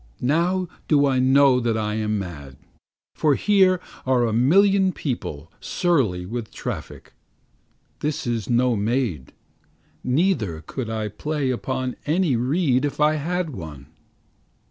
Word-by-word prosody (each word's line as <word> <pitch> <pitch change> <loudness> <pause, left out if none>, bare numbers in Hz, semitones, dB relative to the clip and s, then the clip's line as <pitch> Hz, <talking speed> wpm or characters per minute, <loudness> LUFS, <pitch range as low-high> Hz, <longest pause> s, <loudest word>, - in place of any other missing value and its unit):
Now 175 +7 +1 0.2
do 145 -2 +4
I 135 -2 +2
know 135 0 +5
that 115 -2 0
I 105 -1 -1
am 105 0 -1
mad, 75 -9 -7 0.6
For 150 -3 +2
here 190 -1 +3 0.2
are 130 -2 +2
a 110 - -1
million 190 - +4
people 85 - -5
surly 125 - 0
with 115 +3 -5
traffic; - - -7 0.9
This 150 0 -2
is 115 -4 -2
no 125 0 +2
maid. 105 - -1 0.7
Neither 125 - 0
could 125 +2 -5
I 110 -1 -2
play 140 +6 -2
upon 130 0 -3
any 160 -3 +2
reed 130 +2 +1
if 145 0 -3
I 150 +1 +3
had 175 +2 -2
one. 80 - -9
130 Hz, 130 wpm, -23 LUFS, 110-155 Hz, 0.9 s, know